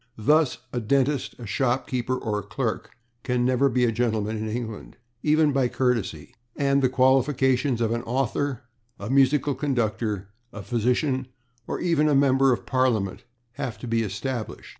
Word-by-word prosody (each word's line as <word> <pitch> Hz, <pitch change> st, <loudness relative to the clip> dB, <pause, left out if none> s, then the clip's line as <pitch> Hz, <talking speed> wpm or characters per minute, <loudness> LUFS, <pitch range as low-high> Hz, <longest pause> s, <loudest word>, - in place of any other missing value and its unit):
Thus 150 Hz, +6 st, +3 dB, 0.2 s
a 125 Hz, -, 0 dB
dentist, 135 Hz, +4 st, 0 dB
a 120 Hz, -, -9 dB
shop 125 Hz, +4 st, 0 dB
keeper 130 Hz, 0 st, -2 dB
or 105 Hz, -4 st, -2 dB
a -, -, -5 dB
clerk 110 Hz, +3 st, -3 dB, 0.3 s
can 125 Hz, 0 st, 0 dB
never 130 Hz, +2 st, +3 dB
be 125 Hz, 0 st, +2 dB
a 115 Hz, -, +2 dB
gentleman 110 Hz, -2 st, -1 dB
in 110 Hz, 0 st, -3 dB
England, 110 Hz, -1 st, -6 dB, 0.2 s
even 155 Hz, 0 st, +3 dB
by 135 Hz, -2 st, +2 dB
courtesy, 120 Hz, -, -1 dB, 0.2 s
and 140 Hz, -1 st, +2 dB
the 130 Hz, -, +3 dB
qualifications 130 Hz, -1 st, +2 dB
of 115 Hz, -1 st, +1 dB
an 115 Hz, 0 st, -1 dB
author, 130 Hz, +1 st, -2 dB, 0.4 s
a 100 Hz, +5 st, -5 dB
musical 140 Hz, +1 st, +3 dB
conductor, 115 Hz, -7 st, -2 dB, 0.2 s
a 105 Hz, -, -8 dB
physician, 125 Hz, +3 st, 0 dB, 0.4 s
or -, -, -3 dB
even 165 Hz, -3 st, +2 dB
a 145 Hz, -, +3 dB
member 135 Hz, -1 st, +4 dB
of 120 Hz, -, -1 dB
Parliament 120 Hz, -7 st, 0 dB, 0.3 s
have 120 Hz, -, -3 dB
to 125 Hz, -, -8 dB
be 115 Hz, 0 st, +1 dB
established. 110 Hz, +3 st, -4 dB
125 Hz, 160 wpm, -25 LUFS, 115-135 Hz, 0.4 s, member